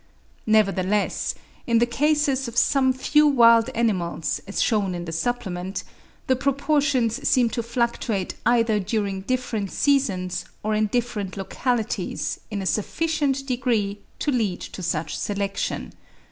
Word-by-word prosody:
Nevertheless, 205 -2 +1 0.3
in 235 -1 +3
the 235 - +4
cases 275 +1 +1
of 235 +1 -7
some 265 -1 +4
few 300 +4 +3
wild 230 -4 +6
animals, 185 -8 0
as 200 - -3
shewn 200 -5 +1
in 175 0 -5
the 165 - -5
supplement, 190 0 -3 0.4
the 260 - +3
proportions 275 -2 +1
seem 245 -4 +3
to 235 - -1
fluctuate 230 -4 -1
either 230 -2 +3
during 200 -1 -2
different 225 -3 -2
seasons 210 -11 +1 0.2
or 215 +1 0
in 215 0 +2
different 210 -4 -2
localities 225 +4 -2
in 205 -3 -3
a - - -5
sufficient 275 - 0
degree 235 -6 0 0.2
to 295 - -1
lead 215 -8 0
to - - -7
such 165 -2 -2
selection. 200 -1 -3
230 Hz, 130 wpm, -24 LUFS, 200-255 Hz, 0.4 s, wild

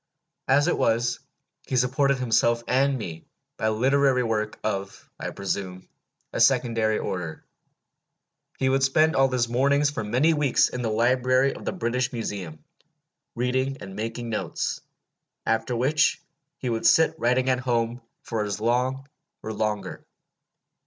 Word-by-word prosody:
As 140 +2 +4
it - - +2
was, 115 +1 +1 0.5
he 130 - -1
supported 135 +2 +2
himself 120 -1 +2
and 135 +1 +2
me 85 -8 -7 0.3
by 110 - 0
literary 130 +3 +2
work 110 -2 -2
of, 100 -2 -4
I - - -4
presume, 95 -1 -4 0.5
a - - -2
secondary 115 -4 +3
order. 85 -4 -5 1.1
He 130 - 0
would 135 +1 +2
spend 155 +4 +3
all 135 0 +4
his 125 -2 0
mornings 140 +4 +2
for 145 - -4
many 125 +10 +2
weeks 150 -3 +2
in 125 - -5
the 115 - -1
library 130 +4 +2
of - - -10
the - - -1
British 125 -6 -1
Museum, 95 -9 -5 0.7
reading 130 +3 -1
and 95 0 -8
making 115 +2 -4
notes; 110 - -3 0.6
after 115 +2 0
which 135 +6 +2 0.4
he - - -5
would 115 0 +1
sit 160 +7 +5
writing 125 +2 +2
at 130 -1 +2
home 120 -1 -1 0.2
for 110 -2 -2
as 105 -1 -3
long 125 +4 0 0.4
or 110 - -4
longer. 105 -1 -3
120 Hz, 145 wpm, -25 LUFS, 110-130 Hz, 1.1 s, sit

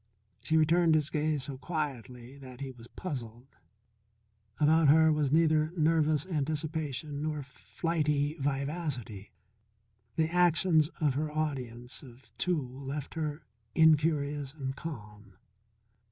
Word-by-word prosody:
She 160 - +1
returned 165 +1 +4
his 155 -1 +1
gaze 150 -2 0
so 135 -1 -7
quietly 130 -6 -5
that 130 -2 -11
he 135 -1 -5
was 120 -2 -13
puzzled. 125 -6 -7 1.0
About 155 +1 +5
her 160 +2 +6
was 150 -3 +1
neither 155 0 +3
nervous 155 -1 +2
anticipation 155 -3 -3
nor 150 -1 -2
flighty 150 +2 -1
vivacity. 135 - -3 0.9
The 160 - +2
actions 175 -2 +4
of 150 -4 +2
her 150 +3 -2
audience 130 -6 -4
of 130 -1 -16
two 180 -3 +1
left 135 +3 -6
her 155 -1 -3 0.3
in 160 -1 +7
curious 145 -2 -2
and 135 -3 -4
calm. 105 - -9
150 Hz, 120 wpm, -30 LUFS, 135-160 Hz, 1.0 s, in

